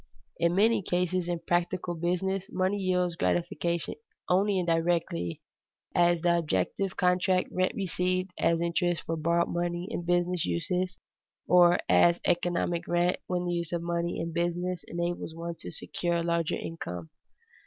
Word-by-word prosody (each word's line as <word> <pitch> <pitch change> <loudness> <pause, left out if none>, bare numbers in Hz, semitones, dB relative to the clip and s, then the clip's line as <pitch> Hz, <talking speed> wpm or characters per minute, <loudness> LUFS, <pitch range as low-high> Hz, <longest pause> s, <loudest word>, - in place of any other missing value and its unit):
In 170 +1 +2
many 220 +2 +4
cases 180 0 0
in 175 -1 -2
practical 175 0 0
business 180 +3 -1
money 185 +2 0
yields 180 -2 +1
gratification 170 0 -1 0.3
only 195 +2 +3
indirectly, 165 - 0 0.5
as 175 -1 +3
the 170 0 +3
objective 165 - -1
contract 185 0 +2
rent 185 0 +1
received 185 -1 -1
as 165 0 +2
interest 170 -1 0
for 165 - -2
borrowed 170 +2 +1
money 175 +1 -2
in 175 - -3
business 175 0 +1
uses, 180 - -1 0.5
or 175 -1 +6
as 175 0 +5
economic 175 0 0
rent 175 +1 +2
when 180 -1 -1
the 175 - -1
use 170 -2 -2
of 170 -1 -2
money 170 0 -1
in 165 0 -3
business 175 +1 -1
enables 170 -1 -3
one 170 +1 -4
to 90 - -7
secure 170 - -3
a 170 - 0
larger 170 -1 0
income. 90 - -6
175 Hz, 145 wpm, -29 LUFS, 170-180 Hz, 0.5 s, or